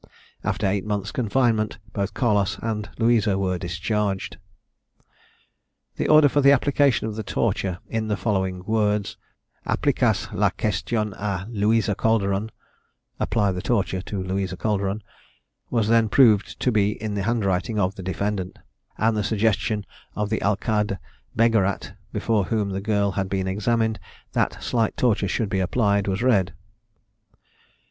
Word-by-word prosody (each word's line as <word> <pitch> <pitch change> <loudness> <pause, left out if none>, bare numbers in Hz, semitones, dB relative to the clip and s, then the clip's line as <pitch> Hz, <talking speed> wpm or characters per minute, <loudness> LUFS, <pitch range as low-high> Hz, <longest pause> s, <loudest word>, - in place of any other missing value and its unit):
After - - -1
the 95 - +3
eight 100 -1 -1
months' 105 -1 -2
confinement, 115 -3 +1 0.2
both 100 0 -2
Carlos 105 -5 +1
and 110 -2 -3
Louisa 115 -4 +3
were 95 -2 -1
discharged. 95 +3 -2 1.6
The - - 0
order 155 -1 +7
for 145 +1 +2
the 140 0 +7
application 140 -2 +3
of 110 - -3
the 110 - -4
torture, 100 -3 -1
in 110 -1 -2
the 105 -1 -1
following 95 -4 -1
words 105 -2 0 0.5
"Applicase - - +1
la - - +3
question 105 +3 -2
a 100 -2 -3
Louisa 110 0 +2
Calderon" 105 -1 +1 0.7
(Apply 105 -4 +1
the 90 -1 -4
torture 95 -5 0
to 95 -1 -4
Louisa 95 0 -2
Calderon) 100 -1 -1 0.7
was 115 -4 +1
then 115 -1 +3
proved 110 -5 +4
to 125 - +2
be 105 -1 +1
in 110 -1 -3
the 100 - -1
handwriting 100 -2 0
of 95 -1 +1
the 100 - -9
defendant; 95 +1 -3 0.4
and 110 0 +2
the 105 - 0
suggestion 110 -1 0 0.3
of 105 0 -2
the 110 - 0
alcade 105 0 0 0.4
Beggerat, 110 -4 +2 0.2
before 105 -1 0
whom 105 -2 -1
the 95 0 -3
girl 100 -1 +1
had 95 0 -2
been 95 -1 -1
examined, 110 +2 0 0.3
that - - -1
slight 115 -3 0
torture 110 -5 +2
should 105 +3 -1
be 95 - 0
applied, 100 +1 +1
was 95 +4 -1
read. 100 -8 +2
105 Hz, 145 wpm, -24 LUFS, 95-110 Hz, 1.6 s, order